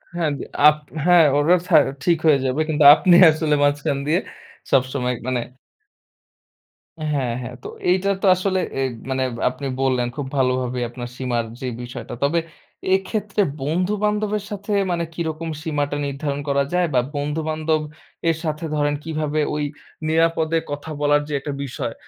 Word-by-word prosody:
হ্যাঁ, 170 -3 0
দি - - -6 0.2
আপ 150 - +6 0.3
হ্যাঁ, 175 -2 +6
ওরা 155 +5 +4
ছা 170 - +3 0.3
ঠিক 170 -2 +3
হয়ে 145 -3 +5
যাবে, 130 +4 0
কিন্তু 150 -1 +2
আপনি 175 +3 +4 0.2
আসলে 155 -1 +1
মাঝখান 145 -1 +1
দিয়ে 165 +4 +3 0.5
সবসময় 130 -1 +1
মানে 125 -2 0 1.7
হ্যাঁ, 130 -5 0
হ্যাঁ। 125 +1 -7
তো - - -6 0.2
এইটা 190 +2 +2
তো - - 0
আসলে 185 0 0 0.2
এ - - 0 0.3
মানে 130 0 0 0.3
আপনি 130 +2 -8 0.2
বললেন, 130 -2 +1
খুব 145 - -4
ভালোভাবে 130 -1 0
আপনার 120 0 -7
সীমার 120 -3 -1 0.2
যে 130 - -3
বিষয়টা। 120 0 -7
তবে 160 +4 +2 0.6
এক্ষেত্রে 205 +2 -1 0.2
বন্ধু-বান্ধবের 210 +6 0
সাথে 205 +1 -5 0.2
মানে 170 -1 0
কিরকম 165 -1 -4
সীমাটা 145 -2 -1
নির্ধারণ 140 0 -3
করা 140 0 +2
যায়, 180 0 +3
বা 125 - +4 0.2
বন্ধু-বান্ধব 155 +2 -1 0.5
এর 165 - +1
সাথে 155 0 -3
ধরেন 145 0 +1
কিভাবে 155 -1 -2 0.2
ওই 150 - -1 0.4
নিরাপদে 165 0 +2
কথা 145 +2 -5
বলার 145 0 +3
যে 150 - -5
একটা 145 +1 -5
বিষয়, 125 -3 -4
150 Hz, 150 wpm, -21 LUFS, 135-170 Hz, 1.7 s, আপ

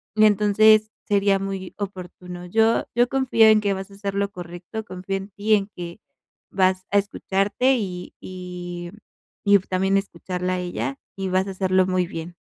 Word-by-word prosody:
y 215 0 +6
entonces 215 +1 +5 0.2
sería 200 -1 +3
muy 195 -1 -5
oportuno. 180 -2 -7
Yo 220 +5 +2
yo 240 +1 +3
confío 255 -4 +4
en 215 -1 +6
que 200 -1 +1
vas 190 0 -6
a - - -13
hacer 200 0 -4
lo 200 0 0
correcto, 175 +4 -7
confío 185 -1 -5
en 195 +1 -8
ti, 205 +2 0
en 200 0 -1
que 175 +2 -7 0.5
vas 185 -1 +2
a 205 - +4
escucharte 200 +6 +1
y 180 -5 -5
y 180 -1 -7 0.5
y 200 0 +7
también 190 +1 +1
escucharla 180 -1 -3
a - - -2
ella, 135 -7 -3 0.2
y 195 -1 -3
vas 185 +1 +1
a - - -3
hacerlo 185 -1 +2
muy 185 -1 +1
bien. 165 +1 -7
195 Hz, 175 wpm, -23 LUFS, 180-205 Hz, 0.5 s, y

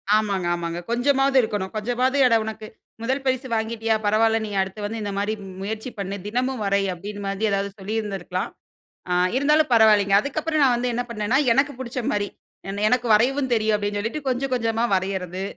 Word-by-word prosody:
ஆமாங்க 200 -4 0
ஆமாங்க. 170 0 -4
கொஞ்சமாவது 270 +2 +2
இருக்கணும். 205 -4 -3
கொஞ்சமாவது 245 +5 0
"அட 230 - +4
உனக்கு 220 0 -6 0.3
முதல் 265 +4 -1
பரிசு 260 0 0
வாங்கிட்டியா 225 0 0
பரவாயில்ல, 220 +2 +3
நீ 210 - -6
அடுத்து 190 +2 -5
வந்து 225 +2 -4
இந்த 205 -1 -3
மாரி 205 +2 0 0.3
முயற்சி 220 +4 -4
பண்ணு, 195 0 -3
தினமும் 250 +2 -1
வரை" 200 0 +2
அப்டீன் 205 +4 -7
மாதி 195 +2 -1
ஏதாவது 200 0 0
சொல்லியிருந்திருக்கலாம். 195 -3 -3 0.6
அ - - +3 0.2
இருந்தாலும் 300 +1 +3
பரவால்லைங்க. 210 -3 +5
அதுக்கப்புறம் 310 +3 -1
நான் 255 -3 +4
வந்து 245 +1 -1
என்ன 245 +1 -1
பண்ணேன்னா, 220 +2 0 0.2
எனக்கு 275 +3 +2
பிடிச்ச 255 0 -4
மாரி, 205 -1 0 0.4
ஏன்னா 200 +1 -4
எனக்கு 245 0 +1
வரையவும் 260 +5 +2
தெரியும். 220 -1 +2
அப்டீன்னு 205 0 -2
சொல்லிட்டு, 255 +8 -4
கொஞ்சம் 255 +1 -1
கொஞ்சமா 230 -1 0
வரையறது. 185 -1 -3
220 Hz, 170 wpm, -23 LUFS, 200-250 Hz, 0.6 s, பரவால்லைங்க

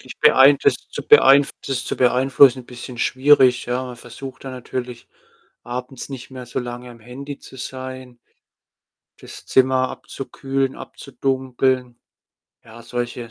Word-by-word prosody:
Ich - - -12
beein 135 +2 +7
das - - +4 0.2
zu - - -5
beeinf 140 +1 +6 0.2
das 130 -3 -2
zu - - -4
beeinflussen, 130 0 +4
bisschen 120 0 -10
schwierig, 130 -1 +3
ja, 125 +1 -1
man 125 -1 -8
versucht 125 +3 -10
da 135 - -6
natürlich 125 -1 -7 0.6
abends 125 +1 -6
nicht 130 -3 -9
mehr 130 -1 -9
so 125 - -3
lange 120 0 -7
am 115 -1 -15
Handy 135 +5 -9
zu - - -14
sein, 130 -1 -8 1.0
das - - -12
Zimmer 130 0 +3
abzukühlen, 135 0 -4
abzudunkeln. 130 -1 -2 0.7
Ja, 115 +1 -13
solche 120 -1 -5
130 Hz, 135 wpm, -21 LUFS, 125-135 Hz, 1.0 s, beein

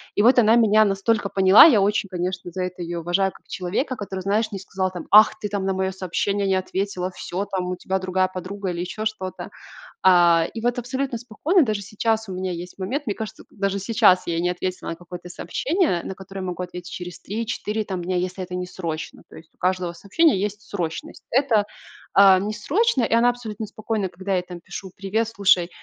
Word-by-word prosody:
И - - +3
вот 245 +4 +5
она 225 0 +5
меня 215 -1 +5
настолько 200 +1 0
поняла. 190 +1 +8
Я 235 -11 +6
очень, 205 +1 +1
конечно, 180 0 -4
за 185 +2 -4
это 180 -1 -5
ее 170 0 -4
уважаю, 180 +3 +1
как - - -21
человека, 200 - -2
который, 195 -3 -5
знаешь, 215 +3 0
не 195 - -5
сказал 190 -1 -3
там: 175 -3 -8
"Ах, 215 +1 +7
ты 210 -1 -4
там 200 -2 -2
на 195 - +1
мое 190 0 -1
сообщение 195 +2 -1
не 190 - +2
ответила, 185 0 -2
всё 185 +2 -4
там, 185 -2 -3
у 180 - -2
тебя 190 +1 -2
другая 185 0 +1
подруга", 185 +1 -5
или 175 0 -3
еще 215 +4 -4
что-то. 190 -4 -4 0.5
А, 175 -3 +5
и 225 - -4
вот 245 0 0
абсолютно 255 0 -2
спокойно, 285 - +1
даже 215 -5 -1
сейчас 220 +2 -1
у 190 - -5
меня 185 0 -3
есть 175 +2 -8
момент, 260 +11 -3
мне 205 - -1
кажется, 220 -1 -7
даже 200 -1 -2
сейчас 190 -3 +4
я 165 -1 -1
не 175 - +1
ответила 185 +1 -4
на 165 - -5
какое-то 180 0 -10
сообщение, 260 - -1
на - - -5
которое 195 +1 -9
могу 180 -1 -4
ответить 180 0 -7
через 180 0 -7
3-4 215 0 -3
там 185 -3 -4
дня, 180 +1 -2
если 185 +1 -2
это 180 0 -8
не - - -5
срочно. 165 -4 -6
То - - -16
есть 160 0 -14
у - - -38
каждого 180 -1 0
сообщения 200 - +2
есть 210 +1 -3
срочность. 170 -5 -5
Это, 230 -6 +3 0.5
а, 195 -1 +7
не 205 +3 -2
срочно, 310 - +1
и 230 - -1
она 235 +1 +5
абсолютно 220 -3 -6
спокойна, 215 -2 -3
когда 190 +3 -5
я - - +3
ей 180 - -3
там 175 -1 -9
пишу: 190 +2 -8
"Привет, 205 +4 -1
слушай, 195 -5 +3
195 Hz, 215 wpm, -23 LUFS, 180-215 Hz, 0.5 s, поняла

